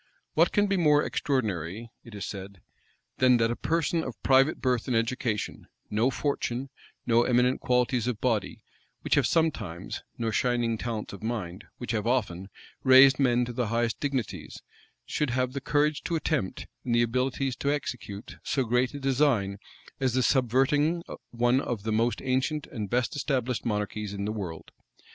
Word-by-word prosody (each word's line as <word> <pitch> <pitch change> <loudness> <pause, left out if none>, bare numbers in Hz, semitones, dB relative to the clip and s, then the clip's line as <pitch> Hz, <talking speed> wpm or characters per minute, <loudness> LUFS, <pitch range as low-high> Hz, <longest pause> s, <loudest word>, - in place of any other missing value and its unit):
"What - - +4
can 205 -1 +3
be 195 -1 +1
more 150 -4 +4
extraordinary," 110 - -2
it 115 -3 -12
is 100 - -4
said,[*] 100 -1 -7 0.6
"than 125 -1 +5
that 115 0 +2
a - - -1
person 165 +2 0
of 130 - -7
private 135 +3 +4
birth 125 -3 0
and 125 -3 +2
education, 115 -2 -2 0.2
no 110 +5 +2
fortune, 135 -1 -2 0.3
no 115 0 +4
eminent 125 +1 +2
qualities 125 -1 +1
of 120 -4 -2
body, 115 -5 -1 0.4
which - - -1
have - - +4
sometimes, 110 - -1 0.2
nor 115 -2 -1
shining 120 0 +1
talents 115 -4 -4
of 100 - -9
mind, 105 -5 -4
which 120 - -4
have 110 -1 -1
often, 100 -7 -1 0.3
raised 130 0 +7
men 125 -2 +3
to 120 - -6
the 120 -1 -1
highest 115 0 0
dignities, 135 -7 -4 0.4
should 150 -2 -1
have 125 +1 0
the 140 - -4
courage 150 +1 +1
to 170 0 -1
attempt, 155 - -1 0.2
and 120 -2 0
the 120 - +4
abilities 130 +2 -1
to 140 - 0
execute, 120 -7 -5
so 135 - 0
great 125 +3 +1
a - - -5
design 130 -8 +1 0.4
as 130 -3 +1
the 130 - +3
subverting 145 +7 +2 0.3
one 120 +2 +2
of 120 -6 -3
the 110 - -2
most 115 +2 +1
ancient 135 +3 0
and 105 -5 -6
best 125 +2 0
established 130 -4 -1
monarchies 105 -1 -2
in 100 0 -3
the 105 - -1
world? 90 -7 -6
125 Hz, 170 wpm, -28 LUFS, 110-135 Hz, 0.6 s, raised